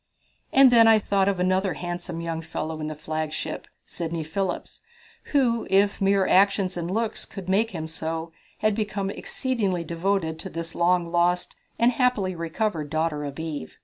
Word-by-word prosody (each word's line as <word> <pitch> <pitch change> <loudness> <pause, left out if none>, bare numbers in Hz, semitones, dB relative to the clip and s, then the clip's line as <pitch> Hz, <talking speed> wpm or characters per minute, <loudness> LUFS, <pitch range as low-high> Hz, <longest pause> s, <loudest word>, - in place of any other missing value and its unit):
And 265 -1 +7
then 230 -2 +7
I 225 -1 +7
thought 200 -2 +1
of 195 -2 -1
another 185 0 +1
handsome 175 -1 -5
young 165 -1 -3
fellow 160 -1 -5
in 155 - -3
the 155 - -4
flagship 155 +1 -4 0.2
Sidney 165 -1 -4
Phillips 180 +4 -3 0.4
who, 245 -5 +1
if 200 +1 +3
mere 195 0 +3
actions 195 -1 +3
and 170 -1 -3
looks 220 +3 -1
could 195 -3 -9
make 205 +4 +2
him 160 -6 -5
so, 160 +1 -4 0.3
had 215 0 +3
become 205 -2 -2
exceedingly 205 -8 -1
devoted 170 -1 -1
to 190 - -7
this 165 -1 -5
long 175 0 +2
lost 175 +1 +1 0.2
and 235 +2 +4
happily 235 -7 +1
recovered 165 -1 -2
daughter 155 -1 -1
of 140 -1 -6
Eve. 155 - -5
180 Hz, 165 wpm, -25 LUFS, 165-200 Hz, 0.4 s, And